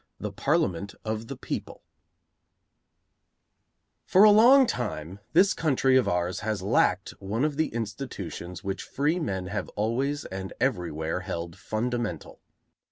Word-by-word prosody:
V - - -13
THE - - -2
PARLIAMENT 95 +2 0
OF 110 +1 -3
THE - - -6
PEOPLE - - -6 2.2
For 190 - +6
a 215 - +9
long 250 +6 +7
time 95 - -4
this 185 +4 +5
country 135 -4 +2
of 130 - +4
ours 90 +1 0
has 110 -3 -2
lacked 100 -2 +2
one 105 +7 -1
of 150 -2 -1
the 160 +1 +1
institutions 100 - -6
which 95 0 -3
freemen 145 - -1
have 100 +1 -4
always 130 +7 -1
and 95 0 -6
everywhere 85 - -1
held 85 -3 -5
fundamental. 120 +1 -3
110 Hz, 130 wpm, -27 LUFS, 95-135 Hz, 2.2 s, a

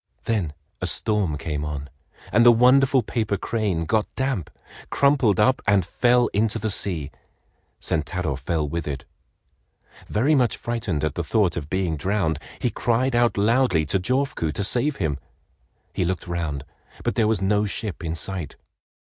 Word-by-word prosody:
Then 100 -10 -1 0.3
a - - 0
storm 105 -9 +1
came 75 0 -3
on, 70 -1 -4 0.4
and 120 - +5
the 120 - +9
wonderful 130 +2 +5
paper 105 -2 -1
crane 95 -6 -1
got 110 +5 +1
damp, 130 - -1 0.4
crumpled 135 -8 +3
up, 130 +5 +3
and 100 -3 +4
fell 120 +6 +3
into 110 +1 +1
the 110 -1 -2
sea. 80 -7 -1 0.7
Sentaro 80 -1 -1
fell 75 +3 -2
with 85 +1 -4
it. 70 -2 -4 1.0
Very 130 +9 +2
much 125 -6 +2
frightened 110 -10 -2
at 75 -2 0
the - - -3
thought 100 -7 +1
of 75 -3 -5
being 90 -4 -1
drowned, 85 -2 0 0.2
he 125 - -1
cried 120 +4 +1
out 120 -3 +2
loudly 105 -6 +3
to 75 +6 0
Jofuku 130 - 0
to 100 - -1
save 125 +8 +1
him. 75 - -2 0.7
He - - 0
looked 90 +1 -2
round, 85 -5 -3 0.4
but - - 0
there 110 - +2
was 110 -2 +2
no 105 +2 +2
ship 100 -2 -3
in 80 0 -2
sight. 85 -2 -5
100 Hz, 160 wpm, -24 LUFS, 80-115 Hz, 1.0 s, the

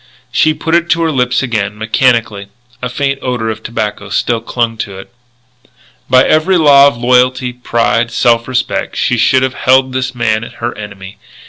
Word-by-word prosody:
She 155 0 +2
put 165 - -3
it 170 0 +2
to 170 - +1
her 160 - 0
lips 125 -2 0
again, 105 -4 -2
mechanically. 110 -2 0 0.3
A 125 - -3
faint 135 +2 -2
odour 120 -3 -2
of 110 - -5
tobacco 105 -3 -4
still 115 +2 -1
clung 115 0 -2
to 100 -3 -6
it. 95 +5 -12 1.0
By 130 0 +5
every 180 +4 +2
law 140 -3 +6
of 140 - -1
loyalty, 125 +1 +1
pride, 120 -1 0
self 115 0 +1
respect, 130 -1 -2
she 125 - 0
should 130 +3 +3
have 130 -1 -1
held 130 0 +2
this 130 -1 -3
man 110 -2 0
her 115 +1 -6
enemy. 100 -2 -10
125 Hz, 170 wpm, -13 LUFS, 115-130 Hz, 1.0 s, law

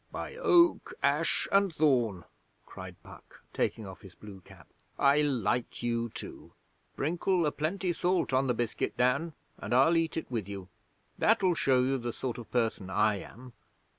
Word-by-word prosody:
'By - - -6
Oak, 345 -8 +3
Ash - - +1
and 195 -1 +3
Thorn,' 120 - +2 0.4
cried - - -10
Puck, - - -15
taking 110 - -1
off 95 -1 -10
his 95 -5 -14
blue 100 -3 -12
cap, 90 -3 -17 0.3
'I 140 +2 +4
like 125 -4 -1
you 115 0 -1
too. - - -9 0.4
Sprinkle 175 +4 0
a 150 - +1
plenty 175 +5 -2
salt 175 -5 0
on 130 +1 +2
the 125 - +1
biscuit, 120 -1 -2
Dan, 140 +7 +1 0.3
and - - -2
I'll 140 +7 +5
eat 165 -1 0
it 160 - -5
with 110 -5 -3
you. 95 -2 -7 0.5
That'll 200 -5 +3
show 130 -5 +2
you 135 +1 0
the 120 -1 -4
sort 125 -2 -4
of 115 - -10
person 110 -5 -1
I 105 +2 +2
am. 125 +5 -12
130 Hz, 165 wpm, -30 LUFS, 110-165 Hz, 0.5 s, I'll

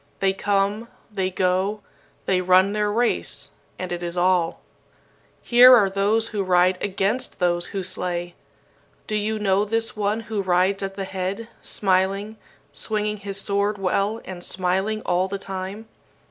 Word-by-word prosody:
They 195 -1 +2
come, 200 +3 0 0.3
they 190 -2 0
go; 185 +3 0 0.4
they 185 -1 +2
run 185 +2 +4
their 210 0 0
race, 235 +3 -1 0.3
and 185 -1 -5
it 175 0 -3
is 175 0 -5
all. 175 -2 +2 0.8
"Here 250 +1 +8
are 200 -5 +3
those 210 +3 +1
who 210 -2 -2
ride 180 0 +3
against 205 +6 -1
those 175 -1 0
who 195 -1 -4
slay. 175 -1 -3 0.7
Do 215 - -3
you 215 +1 -1
know 200 -1 +2
this 225 +2 -2
one 210 +1 -1
who 215 -2 -3
rides 185 +2 +1
at 195 0 -4
the 195 -1 -4
head, 190 +4 -4
smiling, 195 +2 0 0.4
swinging 210 -1 -2
his 200 -1 -4
sword 200 +1 0
well 195 +3 0
and 180 -2 -7
smiling 190 +4 -1
all 180 +1 +1
the 200 +1 -4
time? 195 +2 -6
195 Hz, 150 wpm, -23 LUFS, 185-210 Hz, 0.8 s, Here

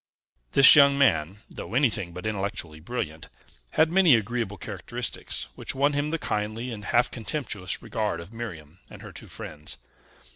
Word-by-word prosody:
This 140 +3 +10
young 140 -1 +6
man, 95 - +2
though 115 - -7
anything 115 -10 +1
but 90 +4 -9
intellectually 100 -7 -2
brilliant, 80 -4 -5 0.4
had 160 +1 +3
many 180 -8 +6
agreeable 115 -2 -2
characteristics 110 +5 -4
which - - -4
won 140 +2 +2
him 145 +1 -1
the 165 - -1
kindly 110 -1 -3
and 105 -2 -7
half 120 +1 +2
contemptuous 110 -6 -4
regard 105 -7 -2
of 85 +6 -10
Miriam 90 -8 -8
and - - -12
her - - -9
two - - -10
friends. 75 0 -5
110 Hz, 155 wpm, -26 LUFS, 90-130 Hz, 0.4 s, This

